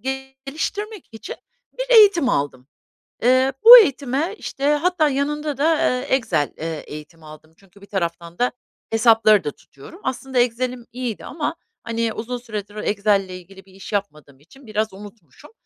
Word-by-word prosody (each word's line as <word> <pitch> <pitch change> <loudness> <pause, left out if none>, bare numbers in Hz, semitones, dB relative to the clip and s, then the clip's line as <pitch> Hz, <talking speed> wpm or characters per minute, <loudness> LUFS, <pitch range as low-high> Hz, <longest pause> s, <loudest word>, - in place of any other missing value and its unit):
geliştirmek 275 - -5
için 225 - -8 0.4
bir - - -2
eğitim 395 - +6
aldım. 140 - -2 0.6
Iıı, 255 +2 +3
bu 480 +2 +12
eğitime, 285 - +1
işte, 275 +1 -4
hatta 315 0 +1
yanında 290 +1 -2
da, 285 - 0
aaa, 255 -6 +1
Excel, 220 - -1
eee, 160 -1 -5
eğitimi 155 +2 -11
aldım. 155 +1 -14
Çünkü 195 0 -22
bir - - -13
taraftan 170 -3 -4
da 245 +1 +2 0.4
hesapları 225 -2 +4
da 145 - -3
tutuyorum. 140 - -16
Aslında 260 0 -2
Excel'im 245 0 -1
iyiydi 245 -3 -5
ama, 305 +4 -4 0.3
hani, 230 -1 -2
uzun 245 +3 -5
süredir 210 -4 -7
Excel'le 205 -2 0
ilgili 185 +1 -12
bir 190 - -21
iş 195 +2 -11
yapmadığım 150 -9 -5
için 230 - -19
biraz 215 -1 -2
unutmuşum 205 - -14
230 Hz, 150 wpm, -21 LUFS, 195-270 Hz, 0.6 s, bu